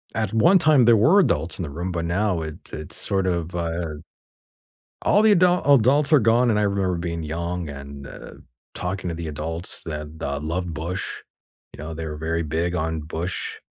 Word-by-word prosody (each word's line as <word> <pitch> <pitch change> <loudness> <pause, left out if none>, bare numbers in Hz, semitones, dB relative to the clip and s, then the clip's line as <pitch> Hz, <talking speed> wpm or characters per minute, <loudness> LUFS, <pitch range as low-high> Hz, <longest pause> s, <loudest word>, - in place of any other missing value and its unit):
at 110 -2 -1
one 170 - +5
time 150 -6 +5
there 115 -1 +6
were 155 - +5
adults 85 - +1
in - - -2
the 80 - -4
room, 85 +6 -4
but 85 -1 -2
now 90 0 0
it 80 -1 -8
it's 75 0 -6
sort 95 -1 -1
of, 85 -1 -2
uh 85 -2 -2 1.1
all 205 - +4
the 220 - +6
adult 180 -1 +4 0.2
adults 140 +5 +3
are 150 - +8
gone, 120 +2 +3
and 105 - +2
I - - +2
remember 100 -3 0
being 85 -1 -3
young, 85 +1 -3
and, 70 0 -9
uh, - - -10 0.4
talking 90 0 -3
to 80 - -3
the 85 -1 -5
adults 80 +3 -5
that, 75 -2 -5
uh, 70 0 -2
loved 85 +3 -3
Bush, 85 +5 -3 0.7
you 75 - -9
know, 80 +1 -6
they 80 0 -5
were 75 -1 -5
very 80 +1 -1
big 80 +3 -1
on 80 -2 -2
Bush. 80 +4 -4
85 Hz, 195 wpm, -23 LUFS, 80-105 Hz, 1.1 s, are